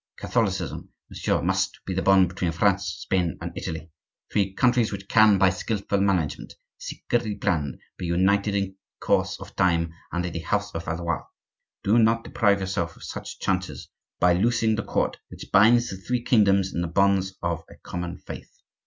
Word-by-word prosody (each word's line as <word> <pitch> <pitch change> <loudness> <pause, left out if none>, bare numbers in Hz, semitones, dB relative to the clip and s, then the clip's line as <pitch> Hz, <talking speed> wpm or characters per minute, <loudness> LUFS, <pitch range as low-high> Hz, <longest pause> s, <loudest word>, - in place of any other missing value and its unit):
Catholicism, - - -1 0.2
monsieur, - - -1
must - - 0
be 95 - -3
the 95 - 0
bond 95 -2 +5
between 90 -1 -2
France, 100 +2 +2 0.2
Spain, 90 -4 0
and - - -6
Italy, 80 0 -5 0.4
three 100 -2 +1
countries 120 +2 +2
which 95 -1 -6
can, 110 -2 +6
by 95 -1 +4
skilful 100 0 -2
management, 90 -7 -1 0.2
secretly 115 -3 -2
planned, 80 -11 -1 0.2
be 90 - -3
united 100 +4 +2
in 95 -1 -2 0.2
course - - +1
of - - -11
time, 85 -3 +2 0.2
under 90 0 -2
the 85 - -4
house 105 +5 -2
of 80 0 -5
Valois. 85 0 -2 0.6
Do 110 +4 +4
not 115 0 +3
deprive 100 -3 +2
yourself 85 -3 -2
of - - -14
such - - -7
chances 95 -1 -2 0.3
by 90 0 +5
loosing 115 +4 +2
the 110 - -1
cord - - -1
which - - -11
binds 120 +4 +5
the 95 - -5
three 120 +5 -2
kingdoms 100 -5 +3
in 85 - -1
the 85 - -1
bonds 95 +2 +2
of 85 -1 -1
a - - -13
common 90 0 -6
faith. - - -9
95 Hz, 170 wpm, -25 LUFS, 85-105 Hz, 0.6 s, can